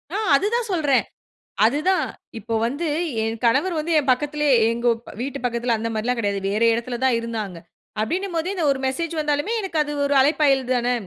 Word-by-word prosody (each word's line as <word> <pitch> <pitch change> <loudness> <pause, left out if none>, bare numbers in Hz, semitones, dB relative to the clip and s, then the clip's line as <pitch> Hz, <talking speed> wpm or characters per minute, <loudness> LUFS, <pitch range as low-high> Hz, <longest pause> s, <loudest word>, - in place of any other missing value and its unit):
ஆ - - 0 0.2
அது 385 - +1
தான் 475 -1 -1
சொல்றேன், 295 -7 +2 0.6
அதுதான், 305 +10 +1 0.3
இப்போ 225 +2 -5
வந்து 285 +7 -2 0.4
என் 225 +1 -2
கணவர் 280 +10 +2
வந்து 330 +2 -3
என் 270 -2 -2
பக்கத்திலேயே, 295 +1 +1 0.2
எங்க 235 +1 -2 0.3
வீட்டு 270 +1 -4
பக்கத்தில 235 0 0
அந்த 230 +1 -3
மாரிலாம் 235 +3 -1
கிடையாது, 200 -3 -1
வேற 210 +2 -1
இடத்தில 240 +1 -3
தான் 260 -3 +3
இருந்தாங்க. 220 -6 -5 0.4
அப்டினும்போது 345 - -2
இந்த 350 -4 -2
1 270 - -2
மெசேஜ் 330 +5 -3
வந்தாலுமே 295 +6 0
எனக்கு 370 -5 -4
அது 295 - -6
1 280 - +1
அழைப்பாயல் 280 -2 +3
தானே, 245 0 +1
270 Hz, 175 wpm, -22 LUFS, 235-315 Hz, 0.6 s, தான்